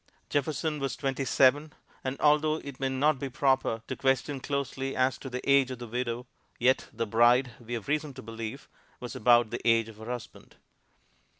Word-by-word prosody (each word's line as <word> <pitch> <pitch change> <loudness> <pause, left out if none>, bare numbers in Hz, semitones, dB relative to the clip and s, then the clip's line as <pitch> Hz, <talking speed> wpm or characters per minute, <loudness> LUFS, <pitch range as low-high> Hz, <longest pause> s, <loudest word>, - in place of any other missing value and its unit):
Jefferson 150 +2 -1
was 135 -1 -2
twenty 135 -1 -2
seven, 145 +4 +3 0.3
and 130 +1 -3
although 150 +1 +4
it 140 -4 -8
may 135 -1 0
not 135 +2 +2
be 140 - -3
proper 130 -3 +1
to - - -3
question 135 +1 0
closely 135 -1 -3
as 130 0 +1
to 135 - -7
the 125 0 -6
age 140 -2 +5
of 130 - -5
the 120 - -7
widow, 120 +1 -3 0.3
yet 130 +2 +2
the 115 0 -2
bride, 120 +4 +4
we 120 0 -5
have 115 - -6
reason 150 0 -1
to 130 0 -11
believe, 115 +3 -7 0.3
was 125 - -7
about 120 0 +4
the 120 - -4
age 115 -1 +3
of 110 - -13
her 110 - -10
husband. 120 -3 -8
130 Hz, 190 wpm, -29 LUFS, 120-140 Hz, 0.3 s, age